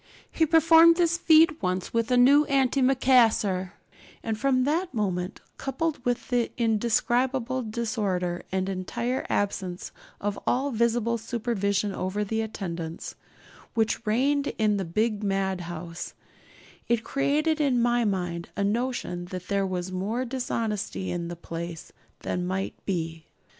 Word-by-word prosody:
He 320 - +2
performed 325 +1 +7
this 340 -1 +3
feat 320 -2 +5
once 185 0 -2
with 230 0 +1
a 250 - +3
new 280 +4 +6
antimacassar; 255 -8 +3 0.5
and 225 -1 -1
from 255 +2 +2
that 320 +3 -1
moment, 185 -3 -2 0.2
coupled 285 +1 -2
with 245 -1 -1
the 240 -2 +1
indescribable 240 +3 +1
disorder 210 -6 -2
and 190 0 -1
entire 195 +7 -2
absence 190 -3 -2 0.3
of 205 0 -2
all 270 +3 +1
visible 235 0 +1
supervision 210 -3 -1
over 190 +3 -2
the 220 +2 -1
attendants, 170 -6 -5 0.6
which 225 0 +1
reigned 275 +6 +2
in 215 -2 +2
the 195 - -2
big 215 +5 0
madhouse, 180 -4 -3 0.7
it 235 -2 +1
created 305 +4 +1
in 265 -4 +2
my 240 0 +2
mind 175 -5 -2
a 200 - +1
notion 210 -5 -1
that 180 0 -8
there 200 -1 +1
was 185 0 -3
more 210 +7 -2
dishonesty 225 -6 -3
in 170 -1 -3
the 175 - -5
place 170 0 -7 0.3
than 180 0 -2
might 190 +1 -2
be. 165 -4 -3
220 Hz, 130 wpm, -26 LUFS, 185-255 Hz, 0.7 s, performed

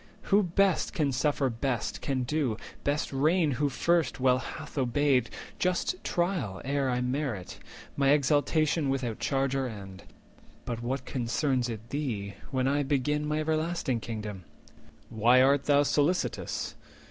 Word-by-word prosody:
Who 205 - +7
best 190 -1 +1
Can 145 -4 +1
suffer 140 +1 +1
best 120 0 -2
can 130 -2 -1
do, 130 -4 0 0.3
best 145 0 -1
reign 155 +3 +3
who 140 +3 0
first 165 +1 +1
Well 130 0 +4
hath 150 +3 -8
obeyed—just 145 - 0
trial 170 - -1
ere 140 -1 0
I 125 0 0
merit 125 -6 -3 0.4
My 140 -1 +2
exaltation 150 +1 +2
without 130 -5 -2
change 135 -1 0
or 135 -1 0
end. 100 -4 -9 0.6
But 120 -1 -4
what 130 +2 -3
concerns 125 +1 0
it 110 0 -6
thee 115 -9 -3 0.2
when 130 -1 0
I 145 +2 +2
begin 145 +2 0
My 150 +1 0
everlasting 155 -4 0
Kingdom? 105 -4 -6 0.7
Why 115 +3 +5
art 135 +2 +4
thou 145 0 +4
Solicitous? 150 +5 0
135 Hz, 135 wpm, -29 LUFS, 125-150 Hz, 0.7 s, Who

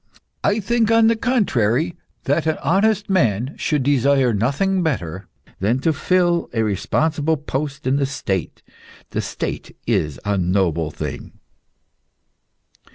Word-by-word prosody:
I 205 +2 +2
think, 225 +2 +1
on 225 0 +5
the 230 - +3
contrary, 170 - +1 0.3
that 150 +4 0
an 160 - +1
honest 205 +7 +2
man 130 - +1
should 150 -4 0
desire 135 -2 +3
nothing 140 - +1
better 95 - -2 0.3
than 110 +6 +1
to 160 +2 +2
fill 175 +2 +1
a 115 -2 +1
responsible 150 - 0
post 140 -1 -4
in 130 +2 +2
the 140 -1 +1
State. 95 - -3 0.5
The - - -1
State - - -5
is 75 -5 0
a 100 -1 +1
noble 85 -3 +1
thing." - - -6
140 Hz, 130 wpm, -21 LUFS, 105-175 Hz, 0.5 s, on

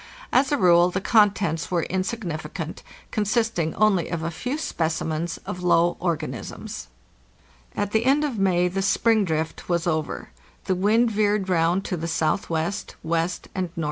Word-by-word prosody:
As 265 +2 +4
a 290 - +3
rule 175 -4 +5
the 185 - -2
contents 200 -6 +2
were 175 -3 +1
insignificant, 180 -5 -4 0.3
consisting 215 -6 0
only 205 -5 +2
of 170 -2 -3
a 165 - -2
few 250 - -3
specimens 160 - -2
of 180 - -5
low 175 -1 +3
organisms. 155 - -4 0.9
At 205 - -1
the 220 +2 +1
end 280 +3 +4
of 265 -8 -2
May 180 -2 +3
the 190 +2 -2
"spring 215 +2 +3
drift" 160 0 -3
was 170 0 +1
over. 155 -3 -2 0.4
The 190 - +1
wind 220 +6 +3
veered 210 -2 +1
round 175 +2 +2
to 180 - -2
the 165 - -4
S.W., 160 +4 0
W., 165 +2 0 0.8
and 185 -2 -2
N.W. - - -2
180 Hz, 155 wpm, -24 LUFS, 165-210 Hz, 0.9 s, rule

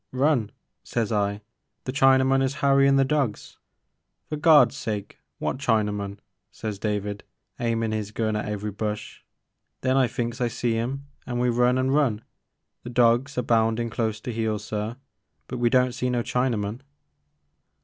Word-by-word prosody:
* - - -53
Run 130 -4 +2
I* - - -28 0.3
sez 115 -2 -2
I, 100 -1 0 0.2
* 110 +1 -53
the 130 - -2
Chinaman 135 0 +4
is 135 +1 0
harryin* 140 0 +4
the 135 - +4
dawgs 135 -6 -2
I - - -52
For 155 - -2
Gawd*s 150 -6 +6
sake 105 -3 -5 0.2
wot - - -2
Chinaman? 105 -5 0 0.2
' 95 +2 -54
sez 105 -3 -5
David, 105 -1 -2 0.4
h*aimin' 115 -2 0
*is 105 -2 -2
gun 110 0 -1
at 105 0 -2
every 105 0 -3
bush. 105 +1 -5 0.6
Then 130 +1 +2
I 130 -2 +4
thinks 120 +1 -3
I 120 - +2
see 115 0 -1
*im 130 +5 -3 0.2
an' 120 - -2
we 125 0 +2
run 125 +1 +3
an* 130 +1 +1
run, 135 -7 +1 0.6
the - - -8
dawgs 120 +3 +2
a 125 - +1
boundin' 115 0 +1
close 110 -2 -1
to 120 - -5
heel 110 -1 -1
sir, 105 +2 -4 0.5
but 125 - -6
we 120 -1 +3
don't 125 0 +3
see 125 +1 -2
no 120 -1 0
Chinaman." 115 -3 -1
120 Hz, 175 wpm, -25 LUFS, 105-130 Hz, 0.6 s, Gawd*s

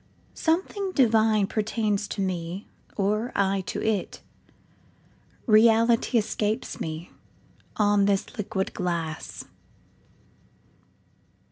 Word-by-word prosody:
Something 375 +4 -1
divine 220 - +4
pertains 210 -1 -1
to 200 - -4
me, 180 0 -3 0.3
Or 215 +4 0
I 195 0 +1
to - - -3 1.7
it;—realityEscapes 225 -1 +3
me 160 +2 -5 0.6
on 205 -1 +3
this 200 +3 0
liquid 210 -3 -3
glass. 170 -3 -3
210 Hz, 75 wpm, -26 LUFS, 195-225 Hz, 1.7 s, divine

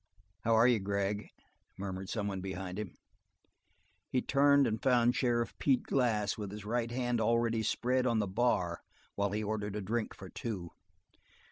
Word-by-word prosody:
"How 115 +3 +2
are 115 +2 +6
you, 120 -3 +4
Gregg?" 100 +1 -1 0.5
murmured 95 0 -5
some 105 -3 -2
one 95 -2 -3
behind 95 0 -5
him. 105 -4 -6 1.1
He 130 - +1
turned 140 0 +5
and 110 0 -1
found 125 -2 +4
Sheriff 120 -2 +1
Pete 135 -3 +2
Glass 110 -6 +1
with 105 -2 -4
his 105 +1 -8
right 115 +1 -1
hand 120 -1 0
already 115 0 +2
spread 125 +3 +1
on 115 -2 +2
the 105 - +2
bar 95 -5 0 0.3
while 100 0 0
he 105 +2 -2
ordered 105 -1 -2
a 105 - -2
drink 110 +3 -2
for 95 - -10
two. 95 -4 -5
110 Hz, 165 wpm, -32 LUFS, 100-120 Hz, 1.1 s, are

